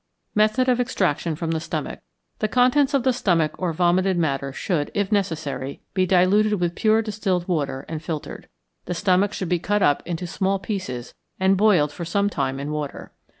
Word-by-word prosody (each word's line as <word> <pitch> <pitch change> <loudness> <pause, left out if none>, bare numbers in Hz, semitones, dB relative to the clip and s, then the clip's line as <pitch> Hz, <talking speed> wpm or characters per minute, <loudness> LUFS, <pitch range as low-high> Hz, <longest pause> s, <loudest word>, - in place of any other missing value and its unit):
Method 215 +5 +3
of 250 -1 +3
Extraction 180 -9 0
from 165 +1 -3
the 160 - 0
Stomach. 170 - -4 0.4
The 215 - +1
contents 255 +5 +3
of 270 - +2
the 260 0 +3
stomach 165 -9 +1
or 180 -2 0
vomited 180 +3 +2
matter 140 -4 -1
should, 150 +1 -2
if 200 0 0
necessary, 155 -9 -2
be 185 -1 +1
diluted 195 +4 +4
with 175 -4 0
pure 220 +3 +2
distilled 195 -5 -1
water 145 -6 -2
and 160 -2 -5
filtered. 160 -2 -6 0.4
The 180 - -3
stomach 190 +3 +2
should 185 -4 -4
be 180 -1 +1
cut 205 +3 0
up 145 - +3
into 175 0 -3
small 190 +3 0
pieces 180 - -5 0.3
and 190 +1 +4
boiled 185 -8 +3
for 170 - -7
some 200 +4 0
time 135 -3 -2
in 145 +2 -4
water. 150 -2 -5
180 Hz, 185 wpm, -23 LUFS, 160-205 Hz, 0.4 s, diluted